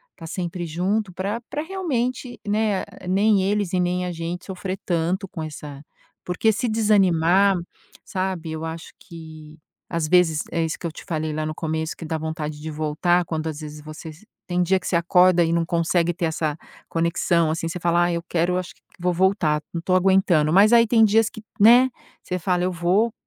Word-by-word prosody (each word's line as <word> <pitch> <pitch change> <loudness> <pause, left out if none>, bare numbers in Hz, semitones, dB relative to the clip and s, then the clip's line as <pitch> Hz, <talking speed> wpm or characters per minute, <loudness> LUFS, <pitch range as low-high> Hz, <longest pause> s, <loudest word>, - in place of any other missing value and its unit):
tá 165 - -10
sempre 175 0 -4
junto 185 +5 -1
pra 200 +5 -3
pra 295 - -3
realmente, 255 -9 -3
né, 210 -1 +1 0.2
nem 200 +1 +3
eles 200 -1 0
e 185 - +2
nem 180 0 0
a 180 - -3
gente 170 +1 -5
sofrer 190 0 -5
tanto 175 +2 -1
com 175 -4 -6
essa 150 -2 -8 0.4
porque 180 +5 +2
se 240 +4 -1
desanimar, 195 -3 +3 0.5
sabe, 185 -4 -3
eu 160 0 -4
acho 165 +1 -7
que 160 -3 -12 0.3
às 165 -2 -1
vezes, 160 -3 +3
é 165 - 0
isso 160 - -3
que - - -8
eu - - -5
te - - -11
falei 160 -4 -2
lá 155 0 -2
no 155 0 -4
começo, 160 0 -3
que - - -9
dá 160 0 -2
vontade 155 -1 -5
de 160 - -5
voltar, 155 +4 +1
quando 160 -1 -3
às 155 -2 -5
vezes 150 0 -8
você 155 +1 -9
se 185 +8 -20 0.2
tem 180 0 0
dia 190 +2 +2
que - - -6
você - - 0
acorda 180 +1 +4
e 165 - 0
não 170 0 +1
consegue 170 +1 +1
ter 170 0 -2
essa 155 -2 -2 0.3
conexão, 170 0 +1
assim, 165 +1 -2
você 180 - -5
fala: 170 0 +2
"Ai, 175 0 +1
eu 170 - -6
quero 180 +1 0
acho 185 -2 -5
que - - -32 0.2
vou 180 +1 0
voltar, 170 -4 +2
não 170 - -3
tô 185 +2 +1
aguentando". 185 -5 +3
mas 205 +5 +6
aí 235 -1 +7
tem 225 0 +5
dias 220 +1 +3
que, 220 - -11 0.2
né, 240 +5 +7 0.3
você 180 - -3
fala: 180 +1 0
"Eu 185 - 0
vou 185 +6 +1
175 Hz, 205 wpm, -23 LUFS, 160-195 Hz, 0.5 s, aí